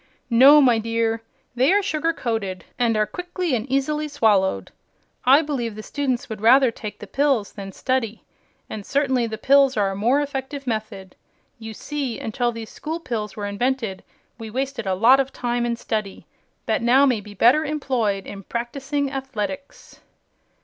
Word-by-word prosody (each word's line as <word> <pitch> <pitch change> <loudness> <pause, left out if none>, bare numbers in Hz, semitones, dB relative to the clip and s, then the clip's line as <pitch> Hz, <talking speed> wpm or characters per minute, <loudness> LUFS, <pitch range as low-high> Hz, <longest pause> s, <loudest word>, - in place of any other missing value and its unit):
"No, 275 +6 +8
my 245 -4 +4
dear. 230 0 -1 0.3
They 255 +6 +3
are 405 +1 +3
sugar 330 -3 0
coated 220 - -3
and 230 -3 +2
are 215 - +3
quickly 355 - -4
and 245 +2 -2
easily 300 +3 0
swallowed. 205 - +1 0.5
I 275 +5 +6
believe 245 -7 -3
the 215 - -8
students 265 -3 -2
would 220 -2 -7
rather 255 +2 +6
take 215 -2 -8
the - - -9
pills 270 -3 0
than 195 -2 -8
study, 235 0 -2 0.4
and 210 - -7
certainly 265 -2 +1
the 220 -1 -5
pills 275 +2 +4
are 200 -2 +2
a - - -5
more 235 +8 +2
effective 280 -1 -4
method. 215 -5 -5 0.4
You 220 -1 -8
see, 280 -4 -4
until 240 +2 -1
these 230 -1 -8
School 320 +2 -5
Pills 220 -9 -4
were 205 - -4
invented 220 -1 -2 0.4
we 225 -1 -7
wasted 260 -1 -3
a 190 - +1
lot 240 +7 +6
of 270 0 0
time 240 -1 -2
in 235 - -1
study 215 -4 -4 0.4
that 280 - 0
may - - -3
now 265 +3 +6
be 210 -6 -1
better 250 +10 +4
employed 255 -10 -1
in 195 - -8
practicing 270 +6 -3
athletics." 265 -4 -6
240 Hz, 170 wpm, -22 LUFS, 215-275 Hz, 0.5 s, No